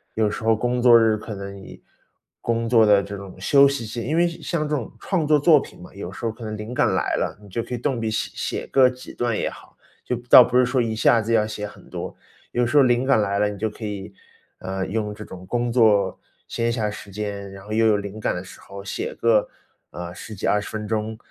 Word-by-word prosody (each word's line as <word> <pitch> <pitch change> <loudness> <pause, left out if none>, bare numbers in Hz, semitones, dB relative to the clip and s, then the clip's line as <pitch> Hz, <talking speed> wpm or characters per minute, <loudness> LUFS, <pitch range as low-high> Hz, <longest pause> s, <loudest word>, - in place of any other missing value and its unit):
有 110 -1 +2
时 105 - -6
候 115 0 +4
工 120 +3 -1
作 120 -1 +7
日 110 -1 +3
可 110 +1 -7
能 100 0 -7
以 95 - -12 0.6
工 115 0 -1
作 115 -2 +5
的 105 -1 +5
这 100 +1 -7
种 95 -1 -10
休 140 +9 +5
息 135 -4 -3
线 115 +2 -5
因 155 +6 0
为 175 +1 +4
像 165 -2 -3
这 150 - 0
种 125 -7 -4
创 180 -6 -1
作 150 0 +4
作 150 -1 +5
品 - - -12
嘛， - - -12
有 95 -2 -6
时 100 - -7
候 115 - 0
可 115 +1 -12
能 110 -1 -5
灵 105 +3 -6
感 - - +2
来 - - 0
了， - - -2
你 105 - -14
就 105 +4 -3
可 - - -8
以 - - -1
动 125 -1 -2
笔 110 -1 -1
写 110 - -2
写 - - -3
个 130 -2 +5
几 125 0 -10
段 120 -3 -1
也 - - -1
好， - - -15 0.3
就 125 - -2
倒 125 - +11
不 125 +1 0
是 125 - +5
说 125 0 +1
一 110 -1 -1
下 115 +1 +4
子 110 +2 -3
要 105 -2 +4
写 105 -1 -5
很 105 - -15
多， - - -6 0.4
有 120 0 +2
时 120 - -2
候 145 - +8
灵 125 0 +2
感 130 -5 +4
来 100 -1 0
了， 105 - +3
你 105 - -7
就 110 +2 0
可 110 +1 -8
以， 100 -2 -5 0.5
呃， 95 0 -4
用 105 0 -2
这 105 +1 -9
种 95 -2 -11
工 120 +4 -1
作 105 -5 +3 0.3
闲 115 0 -1
暇 110 -3 -1
时 105 -1 -9
间， 100 -1 -5
然 95 0 -11
后 105 - -10
又 115 +1 +2
有 110 -2 +4
灵 100 +1 -6
感 110 - -1
的 90 - -5
时 95 - -13
候， 100 0 -10
写 100 - -4
个， 115 -2 +3 0.4
呃， 90 0 -7
10 110 +3 -9
几 95 - -5
20 105 0 +1
分 110 -1 -5
钟， 110 0 -2
110 Hz, 275 characters per minute, -23 LUFS, 105-120 Hz, 0.6 s, 倒